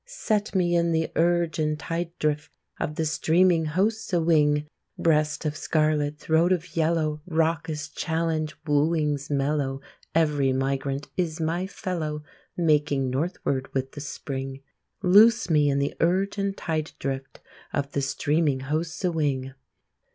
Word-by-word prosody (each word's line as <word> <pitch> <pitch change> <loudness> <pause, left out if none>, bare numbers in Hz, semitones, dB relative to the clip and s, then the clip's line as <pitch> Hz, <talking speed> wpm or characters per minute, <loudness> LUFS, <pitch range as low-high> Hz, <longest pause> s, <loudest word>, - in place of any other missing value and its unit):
Set 215 - -1
me 175 -2 +2
in 170 -1 +2
the 160 0 0
urge 170 -1 +2
and 155 -1 0
tide 165 +2 -3
drift 150 0 -1 0.3
Of 150 - -2
the 160 - -1
streaming 165 +2 +3
hosts 205 +8 0
a 175 - +4
wing! 150 -3 +3 0.3
Breast 155 -1 +1
of 150 0 -1
scarlet, 155 -2 +1
throat 160 +3 +2
of 180 0 -1
yellow, 160 -2 +1
Raucous 160 -2 0
challenge, 160 -1 -2
wooings 150 -1 +1
mellow 140 -1 0 0.4
Every 145 -5 +2
migrant 135 +1 -1
is 170 -3 -1
my 165 +3 -1
fellow, 165 -7 -4 0.3
Making 150 -5 +2
northward 135 -2 -2
with 135 0 -1
the 145 - -8
spring. 135 -1 -5 0.4
Loose 210 +2 +6
me 150 -2 +4
in 140 - +1
the 140 0 0
urge 190 +4 +1
and 200 0 -1
tide 155 -2 -2
drift 135 -1 -4 0.3
Of 140 -1 -2
the 140 - -1
streaming 145 0 +1
hosts 160 +6 -2
a 180 - +2
wing! 135 -5 -1
155 Hz, 145 wpm, -26 LUFS, 145-170 Hz, 0.4 s, Loose